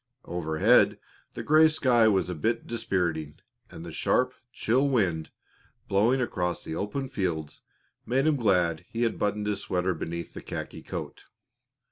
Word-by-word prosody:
Overhead 80 Hz, -2 st, +3 dB, 0.4 s
the -, -, -5 dB
gray 155 Hz, +1 st, +6 dB
sky 125 Hz, -7 st, +3 dB
was 95 Hz, -3 st, +2 dB
a 90 Hz, -, -3 dB
bit 110 Hz, +9 st, -1 dB
dispiriting, 90 Hz, -9 st, -2 dB, 0.3 s
and 80 Hz, -, -10 dB
the 85 Hz, -, -7 dB
sharp, 125 Hz, +10 st, +1 dB, 0.2 s
chill 130 Hz, +6 st, +1 dB
wind, 90 Hz, -, 0 dB, 0.6 s
blowing 110 Hz, +7 st, +3 dB
across 90 Hz, -8 st, -2 dB
the -, -, -5 dB
open 105 Hz, +9 st, -3 dB
fields, 90 Hz, -, -3 dB, 0.4 s
made 135 Hz, +3 st, +1 dB
him 155 Hz, -1 st, +3 dB
glad 90 Hz, -, +1 dB
he 115 Hz, +1 st, -2 dB
had 115 Hz, -, 0 dB
buttoned 105 Hz, 0 st, 0 dB
his 105 Hz, -1 st, -1 dB
sweater 90 Hz, 0 st, 0 dB
beneath 85 Hz, +1 st, -5 dB
the -, -, -8 dB
khaki -, -, -6 dB
coat. -, -, -7 dB
100 Hz, 150 wpm, -27 LUFS, 85-120 Hz, 0.6 s, gray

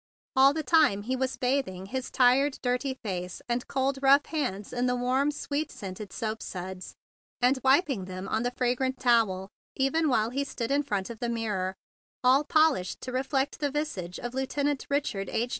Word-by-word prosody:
All 270 Hz, +1 st, +7 dB
the 310 Hz, +2 st, -3 dB
time 250 Hz, -8 st, +4 dB
he 255 Hz, +4 st, -1 dB
was 260 Hz, 0 st, -2 dB
bathing 250 Hz, -8 st, -1 dB
his 260 Hz, +5 st, -4 dB
tired, 265 Hz, +3 st, +3 dB
dirty 250 Hz, +2 st, 0 dB
face 180 Hz, -3 st, -4 dB
and 240 Hz, 0 st, -1 dB
cold, 270 Hz, 0 st, 0 dB
rough 275 Hz, +1 st, +6 dB
hands 210 Hz, -, -3 dB
in 250 Hz, 0 st, 0 dB
the 250 Hz, -, +1 dB
warm, 255 Hz, +3 st, +1 dB
sweet 295 Hz, +1 st, -3 dB
scented 195 Hz, 0 st, -7 dB
soap 220 Hz, +2 st, -3 dB
suds, 185 Hz, 0 st, -7 dB, 0.4 s
and 255 Hz, +1 st, +3 dB
wiping 265 Hz, -, +3 dB
them 185 Hz, +1 st, -6 dB
on 220 Hz, -, 0 dB
the 245 Hz, -, 0 dB
fragrant 250 Hz, +1 st, -1 dB
towel, 220 Hz, -6 st, +2 dB, 0.3 s
even 295 Hz, +4 st, +2 dB
while 225 Hz, -3 st, +2 dB
he 275 Hz, +2 st, -1 dB
stood 250 Hz, -3 st, -4 dB
in 285 Hz, +1 st, +3 dB
front 205 Hz, -6 st, -2 dB
of 225 Hz, -, -9 dB
the 240 Hz, -, -2 dB
mir¬ 225 Hz, -2 st, -2 dB
ror 185 Hz, -1 st, -1 dB, 0.5 s
all 260 Hz, +3 st, +5 dB
polished 305 Hz, -, +2 dB
to 255 Hz, -, -5 dB
reflect 270 Hz, +2 st, -1 dB
the 290 Hz, -2 st, 0 dB
visage 270 Hz, -, -3 dB
of 240 Hz, 0 st, -5 dB
Lieutenant 280 Hz, +2 st, -1 dB
Richard 280 Hz, -9 st, -1 dB
H. 235 Hz, +2 st, -1 dB
250 Hz, 185 wpm, -28 LUFS, 210-275 Hz, 0.5 s, All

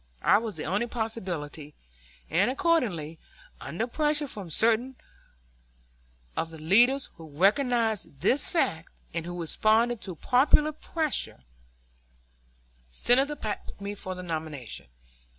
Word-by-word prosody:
I 205 Hz, -, +6 dB
was 220 Hz, -3 st, -5 dB
the 155 Hz, -, -5 dB
only 205 Hz, +7 st, 0 dB
possibility, 180 Hz, -11 st, -4 dB, 0.5 s
and, 185 Hz, +8 st, +2 dB
accordingly, 240 Hz, -, 0 dB, 0.4 s
under 175 Hz, +11 st, -3 dB
pressure 295 Hz, +4 st, +1 dB
from 200 Hz, -8 st, -7 dB
certain 230 Hz, +9 st, +2 dB, 1.4 s
of 165 Hz, -, -1 dB
the 165 Hz, -, -10 dB
leaders 240 Hz, -, +4 dB
who 160 Hz, -1 st, -11 dB
recognized 215 Hz, -, +1 dB
this 250 Hz, -, +2 dB
fact, 165 Hz, -, 0 dB, 0.2 s
and 165 Hz, 0 st, -3 dB
who 175 Hz, 0 st, -5 dB
responded 220 Hz, +7 st, +2 dB
to 185 Hz, -3 st, -6 dB
popular 285 Hz, -, +4 dB
pressure, 305 Hz, -, -2 dB, 1.5 s
Senator 265 Hz, -, +3 dB
Platt 215 Hz, -7 st, -4 dB
picked -, -, -11 dB
me 200 Hz, +1 st, -4 dB
for 185 Hz, -2 st, -6 dB
the 180 Hz, -, -7 dB
nomination. 155 Hz, -, -5 dB
210 Hz, 120 wpm, -28 LUFS, 165-250 Hz, 1.5 s, I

